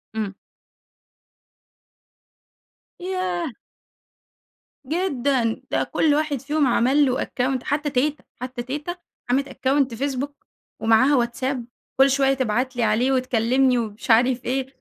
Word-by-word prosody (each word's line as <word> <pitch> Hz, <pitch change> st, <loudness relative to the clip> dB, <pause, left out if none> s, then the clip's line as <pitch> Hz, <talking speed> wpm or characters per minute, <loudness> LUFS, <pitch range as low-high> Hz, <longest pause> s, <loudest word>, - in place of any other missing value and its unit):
إمم. 205 Hz, -3 st, -3 dB, 2.6 s
ياه! 360 Hz, -5 st, -2 dB, 1.3 s
جدًا. 270 Hz, -7 st, 0 dB
ده -, -, +1 dB
كل 305 Hz, -2 st, +1 dB
واحد 295 Hz, -4 st, -1 dB
فيهم 295 Hz, 0 st, +1 dB
عمل 260 Hz, +5 st, +3 dB
له 255 Hz, -1 st, 0 dB
account 255 Hz, 0 st, -1 dB
حتى 295 Hz, +1 st, -1 dB
تيتة، 285 Hz, +3 st, 0 dB, 0.2 s
حتى 250 Hz, -1 st, -5 dB
تيتة 295 Hz, +7 st, -4 dB, 0.3 s
عملِت 275 Hz, +2 st, +1 dB
account 265 Hz, -1 st, 0 dB
Facebook 275 Hz, +1 st, -2 dB, 0.5 s
ومعاها 235 Hz, +3 st, +4 dB
WhatsApp 260 Hz, +3 st, -3 dB, 0.4 s
كل 270 Hz, -, +7 dB
شوية 270 Hz, 0 st, +3 dB
تبعت 255 Hz, 0 st, -1 dB
لي 240 Hz, -, 0 dB
عليه 225 Hz, +5 st, +2 dB
وتكلمني 255 Hz, 0 st, +2 dB
ومش 225 Hz, +1 st, -2 dB
عارف 245 Hz, +2 st, +3 dB
إيه، 265 Hz, +1 st, -1 dB
260 Hz, 115 wpm, -23 LUFS, 245-285 Hz, 2.6 s, كل